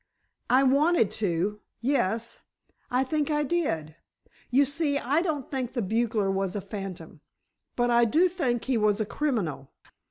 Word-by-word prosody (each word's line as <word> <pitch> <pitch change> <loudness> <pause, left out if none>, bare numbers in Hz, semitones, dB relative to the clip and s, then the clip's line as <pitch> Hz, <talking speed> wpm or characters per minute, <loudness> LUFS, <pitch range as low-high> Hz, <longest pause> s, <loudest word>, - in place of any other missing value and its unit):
"I 260 +2 +5
wanted 280 - +3
to—yes, 210 - -2 0.5
I 250 +1 +2
think 295 +2 -1
I 295 -1 +1
did. 165 - -2 0.5
You 275 +3 +4
see, 285 +1 0
I 280 +4 +1
don't 305 -7 -3
think 260 -3 -3
the 240 -4 -1
bugler 220 -1 0
was 195 -1 -1
a 205 - -2
phantom, 190 -6 -8 0.5
but 240 0 +1
I 235 0 +5
do 320 +11 +4
think 260 -10 -1
he 260 -3 +1
was 210 0 +2
a 215 - 0
criminal. 205 - -2
240 Hz, 150 wpm, -27 LUFS, 200-285 Hz, 0.5 s, I